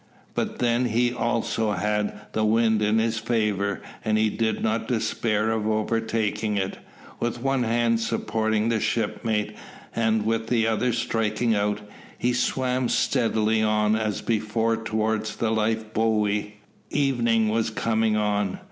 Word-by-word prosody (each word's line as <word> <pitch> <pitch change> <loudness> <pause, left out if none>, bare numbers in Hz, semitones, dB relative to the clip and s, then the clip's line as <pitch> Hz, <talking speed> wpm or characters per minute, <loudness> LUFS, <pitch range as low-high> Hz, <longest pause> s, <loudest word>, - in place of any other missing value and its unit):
But - - -2
then 120 +1 +2
he 120 +1 +1
also 115 -3 0
had 105 +2 -1
the 110 - 0
wind 110 0 +3
in 105 +1 +2
his 110 0 +1
favour, 105 -4 0 0.2
and 110 0 +1
he 110 0 +2
did 110 +1 -1
not 110 0 0
despair 110 -2 0
of 110 -1 -1
overtaking 110 -1 0
it. 95 -1 -2 0.4
With 120 +1 -2
one 135 -1 +1
hand 115 0 +2
supporting 110 0 0
his 110 -2 0
shipmate, 110 -1 -1 0.4
and 110 -2 +1
with 115 0 0
the 115 -2 +2
other 115 +2 +1
striking 115 0 0
out, 105 0 0 0.4
he 125 0 +1
swam 125 0 0
steadily 110 -3 +1
on 105 0 +2
as 110 -2 -1
before 115 0 0
towards 110 -1 -1
the 115 -1 0
life 110 0 -1
buoy. 105 -1 0 0.3
Evening 120 -6 +2
was 110 +1 +1
coming 110 0 +1
on. 105 -2 0
110 Hz, 140 wpm, -25 LUFS, 105-115 Hz, 0.4 s, wind